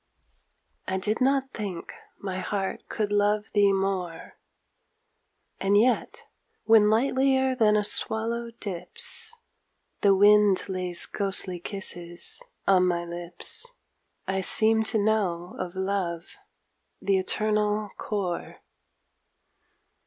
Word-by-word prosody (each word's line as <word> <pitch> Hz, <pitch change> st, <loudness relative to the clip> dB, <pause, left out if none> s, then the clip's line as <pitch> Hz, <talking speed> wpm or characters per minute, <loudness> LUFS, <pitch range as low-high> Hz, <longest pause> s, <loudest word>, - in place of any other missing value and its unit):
I 190 Hz, -, -1 dB
did 210 Hz, +5 st, -1 dB
not 270 Hz, 0 st, +1 dB
think 195 Hz, -6 st, -6 dB, 0.2 s
my 190 Hz, -2 st, -5 dB
heart 195 Hz, +1 st, -4 dB
could 210 Hz, -2 st, -2 dB
love 205 Hz, +1 st, +1 dB
thee 205 Hz, -1 st, +4 dB
more, 190 Hz, -3 st, -3 dB, 1.2 s
And 200 Hz, +1 st, +2 dB
yet, 245 Hz, +4 st, +1 dB, 0.4 s
when 220 Hz, -2 st, +5 dB
lightlier 265 Hz, +3 st, +2 dB
than 215 Hz, -3 st, +3 dB
a 210 Hz, -, +1 dB
swallow 230 Hz, +3 st, +2 dB
dips, 230 Hz, -, -3 dB, 0.6 s
The 200 Hz, -1 st, +4 dB
wind 205 Hz, -1 st, +5 dB
lays 185 Hz, -2 st, -2 dB
ghostly 190 Hz, -3 st, -3 dB
kisses 175 Hz, -, -2 dB, 0.2 s
on 185 Hz, -2 st, +4 dB
my 175 Hz, -1 st, -1 dB
lips 175 Hz, -, 0 dB, 0.6 s
I 190 Hz, 0 st, -1 dB
seem 220 Hz, +3 st, +4 dB
to 220 Hz, -, +2 dB
know 200 Hz, -5 st, -1 dB
of 185 Hz, 0 st, -5 dB
love 190 Hz, -3 st, -3 dB, 0.6 s
the 195 Hz, -1 st, +1 dB
eternal 210 Hz, +1 st, -1 dB
core. 190 Hz, -5 st, -4 dB
200 Hz, 105 wpm, -26 LUFS, 185-220 Hz, 1.2 s, when